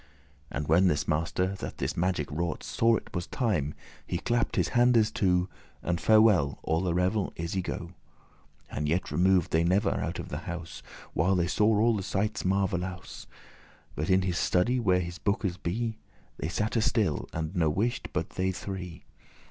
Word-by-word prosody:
And 70 +2 -4
when 90 +4 +5
this 75 -4 +1
master, 85 +4 0
that - - -6
this - - -2
magic 85 -4 0
wrought, 85 +2 -2
Saw 115 0 +2
it - - -6
was 85 -1 -3
time, 90 - -1 0.3
he 90 - -3
clapp'd 120 +5 0
his - - +1
handes 120 -3 +4
two, 90 -3 +2 0.4
And 85 -2 -1
farewell, 105 -7 +5
all 80 +1 +1
the 90 -2 0
revel 95 +3 +1
is 85 0 -4
y 95 - 0
go.* - - -3
*gone, - - -7
removed 90 - -19 0.8
And 75 0 -2
yet 85 +3 0
remov'd 90 -1 +3
they 80 +1 +3
never 95 +4 +2
out - - -2
of - - -6
the 75 - -4
house, 85 -1 -6 0.3
While 95 +2 +2
they 85 -2 +2
saw 105 +4 +3
all 115 +1 +4
the 100 - -2
sightes 105 +2 -1
marvellous; 95 -2 -2 0.7
But 75 - -3
in 95 0 +4
his 90 -2 -1
study, 120 +8 +2
where 95 -5 +3
his 85 +2 -6
bookes 100 -3 -1
be, 110 +6 -3 0.4
They 80 - -3
satte 110 +5 0
still, 105 - 0
and 80 +3 -4
no 80 -3 +3
wight 110 +10 -1
but - - -2
they 95 +1 0
three. 90 -2 -6
90 Hz, 185 wpm, -28 LUFS, 85-105 Hz, 0.8 s, when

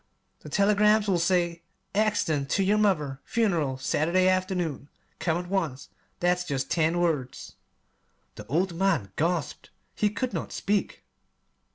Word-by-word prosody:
The - - -11
telegrams 210 +1 +3
will 185 -3 +2
say: 170 -1 +1 0.3
'Accident 165 -9 +1
to 195 - +2
your 205 +3 +2
mother. 150 -10 +1
Funeral 170 - 0
Saturday 170 +7 +1
afternoon. 180 -7 -1 0.3
Come 165 -2 0
at 175 0 -5
once.' 165 -9 -2 0.3
That's 180 0 +1
jest 135 -6 -3
ten 165 0 +2
words." 150 -7 -2 0.8
The - - -11
old 175 +5 0
man 165 - 0
gasped. 165 -2 -2 0.2
He 210 - +1
could 245 +2 -3
not 165 - -4
speak. 205 +1 -2
175 Hz, 135 wpm, -27 LUFS, 155-195 Hz, 0.8 s, telegrams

